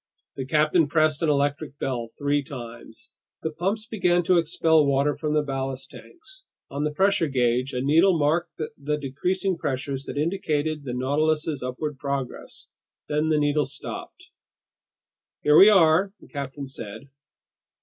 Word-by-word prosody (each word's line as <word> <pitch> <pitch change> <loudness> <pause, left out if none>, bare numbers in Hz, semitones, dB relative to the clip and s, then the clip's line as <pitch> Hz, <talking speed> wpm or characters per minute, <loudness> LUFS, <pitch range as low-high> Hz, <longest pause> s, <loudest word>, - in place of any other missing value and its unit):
The 135 -1 -5
captain 155 +2 +3
pressed 155 +1 +2
an 165 - +2
electric 145 0 0
bell 120 -4 -3
three 145 0 +1
times. 120 -4 -10 0.3
The 160 - -1
pumps 195 +7 -2
began 180 -6 +1
to 180 +1 +4
expel 160 -1 +3
water 140 +1 +2
from 150 -1 -2
the 150 - +2
ballast 135 -2 -4
tanks; 385 +3 -14 0.3
on 140 +1 -2
the 150 - +1
pressure 195 +2 +2
gauge, 125 -1 +1
a 125 - -1
needle 165 +7 +4
marked 160 +4 0 0.2
the 150 +1 -1
decreasing 180 +7 -2
pressures 140 -2 -3
that - - -6
indicated 155 -2 -1
the 125 - -4
Nautilus's 150 +3 0
upward 130 +3 -4
progress; 140 -2 -5 0.4
then 150 +1 +1
the 155 - +3
needle 145 0 +1
stopped. 365 - -8 1.1
"Here 150 0 +5
we 195 +6 +9
are," 185 -1 +4
the - - -16
captain 140 -1 -5
said. 115 0 -8
150 Hz, 150 wpm, -25 LUFS, 135-165 Hz, 1.1 s, we